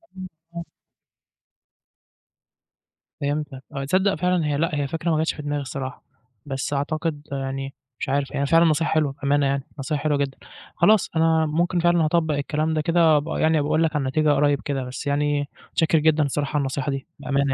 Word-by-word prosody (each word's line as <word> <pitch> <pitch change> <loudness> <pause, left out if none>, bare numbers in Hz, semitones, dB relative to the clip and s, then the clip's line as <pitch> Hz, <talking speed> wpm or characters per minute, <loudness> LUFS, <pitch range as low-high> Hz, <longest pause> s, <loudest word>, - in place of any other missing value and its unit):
امم، 185 -1 -7 0.3
امم. 170 - -4 2.6
فهمتك 145 -2 -3
آه، 135 - -2
تصدق 190 +6 +2
فعلًا 180 0 +1
هي 145 -1 0
لأ، 160 0 0
هي 145 -1 -1
فكرة 165 +3 -2
ما 155 - +2
جاتش 160 +1 +1
في - - -8
دماغي 145 0 -2
الصراحة، 135 -1 -6 0.4
بس 140 +2 -3
أعتقد 150 +1 -2
يعني 135 0 -4 0.3
مش - - -3
عارف 140 0 0
يعني 140 - -2
هي 140 - +1
فعلًا 165 +2 +5
نصيحة 160 0 +2
حلوة، 150 -3 +2
بأمانة 140 0 +2
يعني، 135 0 0 0.2
نصيحة 145 +1 -2
حلوة 150 -2 +1
جدًا. 140 -1 -2 0.4
خلاص 215 -2 +4
أنا 160 0 +3
ممكن 175 +3 0
فعلًا 175 -1 +3
هاطبّق 160 -2 +1
الكلام 155 +2 -1
ده 155 - +1
كده 165 -1 +4
وأبقي 145 0 -1
يعني 160 0 +3
أبقي 145 - -1
أقول 155 +2 +2
لك 160 -1 0
على 145 - +1
النتيجة 150 +4 +1
قريب 145 -1 +2
كده، 135 -3 -2
بس 130 +3 -6
يعني 145 0 0 0.2
متشكر 160 0 +2
جدًا 155 0 +3
الصراحة 145 0 -2
على - - +2
النصيحة 135 +1 -2
دي، 135 -1 -5
بأمانة 140 -1 0
150 Hz, 190 wpm, -23 LUFS, 140-160 Hz, 2.6 s, فعلًا